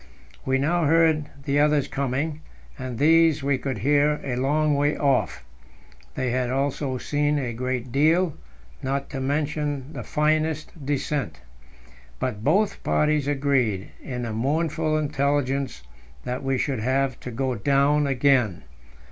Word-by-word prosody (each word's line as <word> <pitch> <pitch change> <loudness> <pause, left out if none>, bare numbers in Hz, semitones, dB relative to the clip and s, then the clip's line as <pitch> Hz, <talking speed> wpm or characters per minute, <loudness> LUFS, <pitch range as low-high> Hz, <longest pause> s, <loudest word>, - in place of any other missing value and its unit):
We 130 0 +3
now 160 +5 +1
heard 160 -1 +3 0.2
the 145 0 +1
others 150 -1 +3
coming, 140 +3 -2 0.4
and 130 -2 -5
these 160 +1 +4
we 140 -1 +1
could 130 -4 -3
hear 145 +6 +2
a 130 -3 -2
long 150 +4 +1
way 145 +1 +1
off. 100 - 0 0.7
They 130 -2 -1
had 125 0 0
also 135 0 -1
seen 145 +3 0
a 125 -4 -2
great 125 0 -3
deal, 160 +5 +3 0.5
not 135 +1 -2
to 135 - -4
mention 145 0 -2
"the - - -5
finest 155 0 0
descent." 145 - -2 0.8
But 110 - -3
both 195 - +2
parties 150 -2 +1
agreed 135 -8 0
in 125 -3 -5
the 115 -2 -3
mournful 155 +5 0
intelligence 140 - -1 0.4
that 125 +1 -3
we 135 -1 0
should 130 -1 -1
have 130 +2 0
to - - -7
go 130 +2 -1
down 140 +5 +2
again. 130 -7 +2
140 Hz, 140 wpm, -24 LUFS, 130-150 Hz, 0.8 s, these